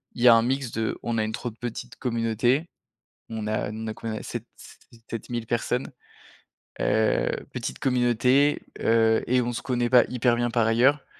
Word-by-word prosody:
y 120 Hz, +1 st, +3 dB
a 120 Hz, -, +10 dB
un 115 Hz, -, +5 dB
mix 130 Hz, +1 st, -1 dB
de 110 Hz, 0 st, -2 dB
on 115 Hz, -1 st, -1 dB
a -, -, +2 dB
une 110 Hz, -, -2 dB
trop 120 Hz, +2 st, -4 dB
petite 115 Hz, +1 st, -7 dB
communauté, 120 Hz, +5 st, 0 dB, 0.6 s
on 110 Hz, -2 st, -4 dB
a 110 Hz, -1 st, -1 dB
on 110 Hz, +1 st, -6 dB
a 110 Hz, -, -3 dB
quoi, 110 Hz, -1 st, -5 dB
sept -, -, -6 dB
se 115 Hz, -, -17 dB
sept 115 Hz, -, -6 dB
mille 120 Hz, -2 st, -3 dB
personnes, 120 Hz, +2 st, -1 dB, 0.9 s
heu, 110 Hz, +1 st, +2 dB, 0.2 s
petite 65 Hz, -, -4 dB
communauté, 125 Hz, +3 st, +2 dB, 0.2 s
heu 110 Hz, 0 st, +3 dB
et 125 Hz, +1 st, +3 dB
on 120 Hz, 0 st, -2 dB
se -, -, -4 dB
connaît 120 Hz, -2 st, -1 dB
pas 125 Hz, -2 st, +7 dB
hyper 120 Hz, -1 st, +2 dB
bien, 120 Hz, 0 st, 0 dB
par 115 Hz, -1 st, +2 dB
ailleurs. 130 Hz, +6 st, +3 dB
120 Hz, 180 wpm, -25 LUFS, 110-125 Hz, 0.9 s, a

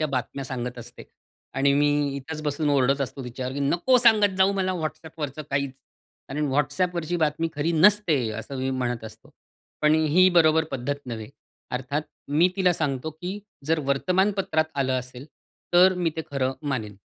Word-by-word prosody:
WhatsAppवरच्या 155 Hz, -, +1 dB
बातम्या 130 Hz, +2 st, -3 dB
सांगत 125 Hz, -2 st, -5 dB
असते 120 Hz, -, -11 dB, 0.5 s
आणि 140 Hz, +1 st, +3 dB
मी 145 Hz, -1 st, +2 dB
इथेच 155 Hz, +3 st, -6 dB
बसून 150 Hz, 0 st, 0 dB
ओरडत 135 Hz, 0 st, +2 dB
असतो 135 Hz, -1 st, -4 dB
तिच्यावर, 125 Hz, +1 st, -5 dB
नको 175 Hz, -, +3 dB
सांगत 210 Hz, -5 st, +5 dB
जाऊ 190 Hz, +1 st, +4 dB
मला 185 Hz, -1 st, 0 dB
WhatsApp 160 Hz, -1 st, -5 dB
वरचं 150 Hz, 0 st, -4 dB
काहीच. 140 Hz, -1 st, -1 dB, 0.6 s
कारण 150 Hz, +1 st, -2 dB
WhatsApp 150 Hz, +6 st, 0 dB
वरची 170 Hz, 0 st, -2 dB
बातमी 160 Hz, 0 st, 0 dB
खरी 150 Hz, +3 st, 0 dB
नसते, 165 Hz, -, +4 dB
असं 115 Hz, +5 st, -6 dB
मी 130 Hz, +1 st, -1 dB
म्हणत 120 Hz, -3 st, -2 dB
असतो. 110 Hz, -, -12 dB, 0.5 s
पण 150 Hz, 0 st, +5 dB
ही 160 Hz, +4 st, +4 dB
बरोबर 160 Hz, -2 st, +4 dB
पद्धत 135 Hz, +1 st, -2 dB
नव्हे, 110 Hz, -3 st, -6 dB, 0.4 s
अर्थात 130 Hz, +4 st, -2 dB, 0.3 s
मी 155 Hz, +5 st, +4 dB
तिला 185 Hz, -2 st, +3 dB
सांगतो, 150 Hz, -2 st, -2 dB
"की 180 Hz, +6 st, -6 dB, 0.3 s
जर 165 Hz, +1 st, +2 dB
वर्तमानपत्रात 185 Hz, +2 st, +1 dB
आलं 135 Hz, -2 st, 0 dB
असेल 125 Hz, +1 st, -9 dB, 0.5 s
तर 185 Hz, +1 st, +7 dB
मी 175 Hz, -2 st, 0 dB
ते 160 Hz, -, -2 dB
खरं 135 Hz, -2 st, 0 dB, 0.2 s
मानेन. 110 Hz, -7 st, -3 dB
145 Hz, 165 wpm, -25 LUFS, 135-170 Hz, 0.6 s, तर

